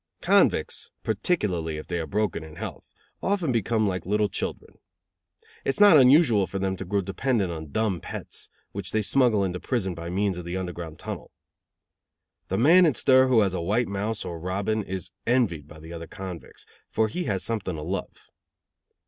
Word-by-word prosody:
Convicts, - - +2
particularly 95 - 0
if 75 - -7
they 85 -1 -3
are 80 - -3
broken 105 -5 -1
in 80 0 -11
health, 95 -4 -7 0.3
often 190 -8 0
become 115 -1 +1
like 90 -3 -2
little 105 +2 +1
children. - - -5 0.8
It - - -2
is - - -5
not 205 -4 +8
unusual 125 - +5
for 95 - -4
them 95 0 -1
to 95 - -5
grow 100 +2 0
dependent 95 +1 0
on 80 -2 -6
dumb 105 0 -1
pets, - - -6 0.2
which 95 -1 -6
they 110 0 +1
smuggle 120 -3 +3
into 90 -1 -2
prison 100 -7 -1
by 85 0 -6
means 95 0 0
of 90 - -8
the 85 +2 -3
Underground 85 -3 -5
Tunnel. - - -7 1.2
The 95 - -1
man 170 +8 +6
in 145 - +1
stir 130 -1 +5
who 125 -4 +5
has 95 -3 +1
a 90 - -2
white 110 +8 +1
mouse 100 +2 -2
or 85 -1 -5
robin 100 +5 -1
is 95 -3 -5 0.2
envied 105 - +1
by 75 - -13
the 80 +2 -10
other 85 -1 -7
convicts, 95 -4 -9 0.2
for 110 - +1
he 175 +12 -3
has 95 -3 -1
something 100 -4 -2
to 75 - -6
love. 95 +5 -5
100 Hz, 185 wpm, -26 LUFS, 90-110 Hz, 1.2 s, not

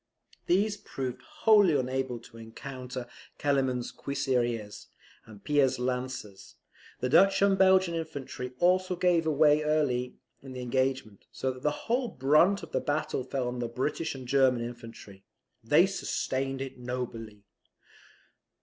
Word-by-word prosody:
These 205 +4 +2
proved 130 -9 -6
wholly 220 - +4
unable 130 -1 -2
to 115 - -15
encounter 125 +2 -7 0.3
Kellerman's 130 -4 0
cuirassiers 120 -6 -2 0.4
and 105 -3 -14
Pire's 135 -3 +2
lancers; 125 -5 -4 0.5
the 125 - +1
Dutch 195 +6 +5
and 200 -1 +4
Belgian 190 -2 +4
infantry 140 -6 -5
also 185 +2 +2
gave 175 -2 +2
way 150 0 +4
early 145 -5 0 0.3
in 135 -1 -10
the 125 - -6
engagement; 130 -4 -2
so 130 - -2
that 130 0 -10
the 150 +1 -2
whole 245 +2 +1
brunt 165 - +3
of 165 - -9
the - - 0
battle 145 -3 -1
fell 130 -1 -3
on 125 0 -4
the 120 - -2
British 140 +6 -2
and 130 -2 -9
German 130 -2 +3
infantry. 115 -5 -10 0.4
They - - +5
sustained 135 0 -2
it 135 -1 -9
nobly. 115 -4 -6
135 Hz, 135 wpm, -29 LUFS, 125-160 Hz, 0.5 s, Dutch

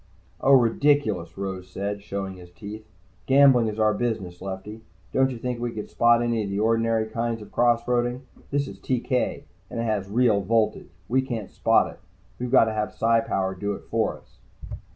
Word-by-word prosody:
"Oh, 140 - +4
ridiculous," 115 - +2
Rose 95 -2 -5
said, 100 +2 -4
showing 100 -2 -5
his 90 -1 -13
teeth. 105 +3 -9 0.4
"Gambling 135 -4 +6
is 105 0 -4
our 110 -1 +3
business, 100 -6 -3
Lefty. 95 +3 -6 0.3
Don't 135 0 +3
you 125 - -5
think 125 +1 -3
we 120 -1 -3
could 105 - -7
spot 120 0 +4
any 115 -2 0
of 100 - -4
the 100 - -2
ordinary 115 0 +2
kinds 115 +1 -2
of 105 - -12
cross 120 -1 +3
roading? 120 +1 0 0.3
This 140 0 0
is - - -10
TK, 125 0 -1 0.3
and 120 - -5
it - - 0
has 105 -4 -1
real 110 -2 +3
voltage. 110 +2 0 0.2
We 130 +3 +2
can't 115 -6 -5
spot - - +2
it. - - -20 0.4
We've 125 0 -3
got 130 -2 +6
to 110 - -2
have 105 0 -2
Psi 115 +1 +3
power 95 -4 -1
do 100 +2 -3
it - - -11
for - - 0
us." - - -25
115 Hz, 195 wpm, -25 LUFS, 100-120 Hz, 0.4 s, Gambling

